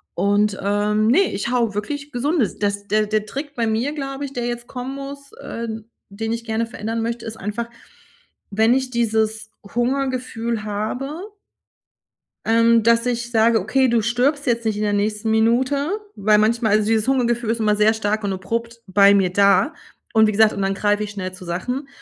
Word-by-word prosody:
Und, 205 +2 +2
ähm, 210 +2 +1
ne, 375 +10 +4
ich 200 +4 -2
haue 235 -4 +1
wirklich 285 +8 -4
Gesundes 260 - 0
das 205 0 -2
der 215 +1 +2
der 215 0 0
Trick 280 +6 -6
bei 230 -2 0
mir, 230 +6 0
glaube 275 -1 -4
ich, 275 - -8
der 240 -2 -2
jetzt 240 0 -5
kommen 255 +2 -6
muss 280 0 -8
äh, 230 0 -5 0.4
den 220 +3 -3
ich 230 0 -4
gerne 225 0 -1
verändern 225 0 -4
möchte, 235 0 -3
ist 220 -1 -6
einfach, 220 +3 -4 0.8
wenn 220 +3 +3
ich 260 0 0
dieses 220 -2 0
Hungergefühl 240 -1 -2
habe 260 - -4 1.2
Ähm, 230 0 +4
dass 230 +1 +3
ich 240 -1 -2
sage: 225 -1 +3
„Okay, 260 +7 +2
du 235 -2 +2
stirbst 255 +6 +1
jetzt 235 -2 +1
nicht 220 -2 0
in 210 - -2
der 210 -1 +1
nächsten 210 +2 -1
Minute“, 250 +6 +2 0.3
weil 210 +1 +3
manchmal 220 0 +2
also 210 0 +3
dieses 220 +1 +1
Hungergefühl 240 -3 +1
ist 230 0 -1
immer 210 -1 +2
sehr 210 +1 +4
stark 215 0 -1
und 200 - 0
abrupt 230 +5 -4
bei 200 +1 +5
mir 190 -3 +2
da 200 - +4 0.4
und 220 0 +5
wie - - +1
gesagt 215 +1 +4
und 200 - -3
dann 195 0 +1
greife 205 +1 +1
ich 210 - -4
schnell 185 -3 -5
zu 185 0 -11
Sachen. 250 +11 -3
225 Hz, 190 wpm, -21 LUFS, 210-245 Hz, 1.2 s, bei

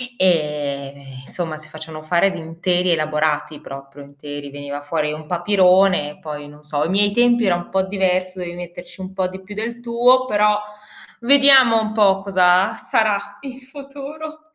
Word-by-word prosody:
ehm, 140 - -2
insomma, 160 -1 -5
si 155 0 -13
facevano 155 0 -9
fare 175 +4 +2
di - - -7
interi 175 +2 -1
elaborati, 150 -1 -1
proprio 135 0 -11
interi, 145 0 -9
veniva 145 0 -7
fuori 150 0 -2
un 155 +1 -7
papirone, 180 -3 +2
poi 150 -2 -7
non 150 +1 -16
so, 150 -1 -4
ai 160 - -2
miei 205 +2 +2
tempi 240 +1 +3
era 175 - +3
un 175 - -6
po' 190 0 +1
diverso, 185 -1 -1
dovevi 175 -1 -6
metterci 175 +1 -10
un 185 0 -7
po' 190 -1 -1
di 190 +1 -9
più 200 +2 -11
del 235 +2 -5
tuo, 245 +2 +3
però 210 -3 +2 0.6
vediamo 270 -3 +6
un 215 0 -4
po' 195 -3 +3
cosa 185 -1 +3
sarà 205 -2 -1
il 265 -1 -9
futuro. 285 +3 -10
180 Hz, 165 wpm, -20 LUFS, 150-210 Hz, 0.6 s, vediamo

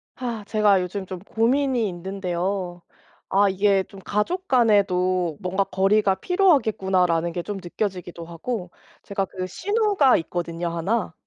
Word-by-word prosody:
아 235 -4 -4
제가 205 -3 +3
요즘 190 +2 -4
좀 185 -1 -7
고민이 240 +4 +1
있는데요. 180 0 -3 0.5
아 200 +1 +4
이게 195 0 +2
좀 195 - -14
'가족 345 - -2
간에도 185 - +2
뭔가 190 +1 0
거리가 195 +1 +2
필요하겠구나.'라는 190 - +2
게 175 +1 -3
좀 205 -1 -5
느껴지기도 175 -2 -4
하고 180 +3 -5 0.3
제가 195 -1 -2
그 185 0 -5
시누가 405 - +2
있거든요, 170 0 -3
1. 175 +4 -1
195 Hz, 290 characters per minute, -23 LUFS, 180-220 Hz, 0.5 s, 아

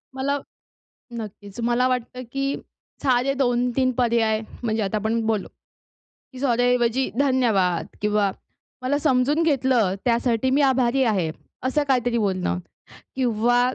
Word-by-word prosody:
मला 280 +2 0 0.8
नक्कीच. 205 0 -9
मला 240 +2 +2
वाटतं, 250 0 -2
की 275 +1 -1 0.5
साधे 260 0 +2
2-3 250 0 +1
पर्याय 230 -3 +2 0.2
म्हणजे 220 -1 0
आता 200 +2 -1
आपण 220 +2 0
बोललो, 215 -3 0 0.9
की 255 - -9
सॉरी 245 -3 +2
ऐवजी 245 +1 +2
धन्यवाद 230 -11 +2
किंवा 210 -1 +2 0.5
मला 285 +3 +1
समजून 285 +2 +2
घेतलं, 260 - +2
त्यासाठी 240 0 +1
मी 275 +3 +3
आभारी 265 -1 +3
आहे. 195 -9 +1 0.3
असं 275 +3 +1
काहीतरी 245 -3 +2
बोलणं 185 - 0 0.6
किंवा 245 -1 +2
245 Hz, 120 wpm, -23 LUFS, 220-265 Hz, 0.9 s, मी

